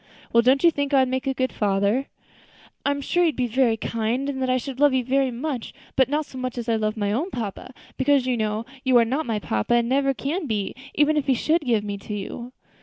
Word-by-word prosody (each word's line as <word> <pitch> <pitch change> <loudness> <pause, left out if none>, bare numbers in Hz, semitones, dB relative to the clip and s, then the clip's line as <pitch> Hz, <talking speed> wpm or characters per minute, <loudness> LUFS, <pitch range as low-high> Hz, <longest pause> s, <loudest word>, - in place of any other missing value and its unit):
"Well, 235 - +6
don't 260 +5 +3
you 340 - +7
think 285 -1 -1
I 270 - +6
would 260 - +1
make 260 +1 -2
a 270 - +1
good 260 0 0
father?" 205 +5 +1 0.8
"I - - +1
am 285 0 -1
sure 350 +5 +1
you 350 - +5
would 315 - -1
be 250 - 0
very 240 -1 +2
kind, 230 +5 -2
and 265 -1 -3
that 260 - 0
I 255 - +3
should 260 +1 -6
love 290 -2 +5
you 255 - +1
very 270 +1 +2
much; 250 0 -4 0.2
but 265 0 +3
not 300 +2 0
so 260 - -9
much 255 -1 -4
as 240 -1 -4
I 230 - +2
love 215 0 -1
my 205 -1 0
own 285 - -1
papa; 230 - -5 0.3
because, 270 -1 +3
you 255 -1 +1
know, 215 0 -2 0.2
you 260 -2 +4
are 235 - +5
not 270 +6 -2
my 225 -2 0
papa, 110 - 0
and 235 -1 +2
never 275 +1 +2
can 305 +6 -3
be, 210 -4 -2 0.2
even 300 +1 +3
if 290 -1 -1
he 265 - +4
should 320 +7 +1
give 235 -7 +1
me 205 -1 -4
to 210 +1 -6
you." 235 +5 -6
255 Hz, 260 wpm, -24 LUFS, 225-275 Hz, 0.8 s, you